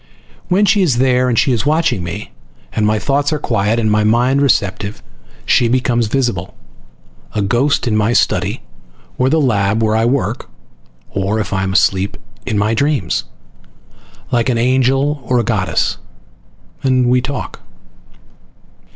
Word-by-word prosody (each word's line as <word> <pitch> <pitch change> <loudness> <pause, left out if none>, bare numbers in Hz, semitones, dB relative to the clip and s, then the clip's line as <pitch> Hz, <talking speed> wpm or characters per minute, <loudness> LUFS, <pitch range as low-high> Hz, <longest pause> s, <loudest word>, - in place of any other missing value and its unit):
When 190 +3 +3
she 205 -1 +3
is 150 -10 +2
there, 125 0 +2
and 115 - +2
is 120 -5 +1
watching 150 - +1
me, 85 0 -6 0.4
and 105 -1 +1
my 110 0 +2
thoughts 140 +6 0
are 155 - 0
quiet 105 -6 0
and 110 -2 +1
my 105 0 +2
mind 120 +5 +2
receptive, 100 -6 0 0.4
she 120 - +3
becomes 120 -1 +1
visible. 120 -8 -2 0.8
A 105 - 0
ghost 125 +7 +1
in 110 - +1
my 105 +1 +1
study, - - 0 0.6
or 130 +1 +3
the 160 +3 +2
lab 110 -5 +1
where 110 0 +1
I 110 +1 +2
work, 130 - -1 0.6
or 100 +3 -1
if 100 -2 -3
I 95 - 0
am 95 0 -2
asleep 95 0 +1 0.3
in 110 - -1
my 105 +2 +1
dreams. 135 - 0 1.1
Like 120 0 +1
an 120 - +1
angel, 130 +4 +1
or 125 +1 0
a - - +1
goddess. 100 -4 -1 0.8
And 130 -2 +2
we 125 +1 +3
talk. 135 +1 -6
120 Hz, 150 wpm, -16 LUFS, 105-135 Hz, 1.1 s, When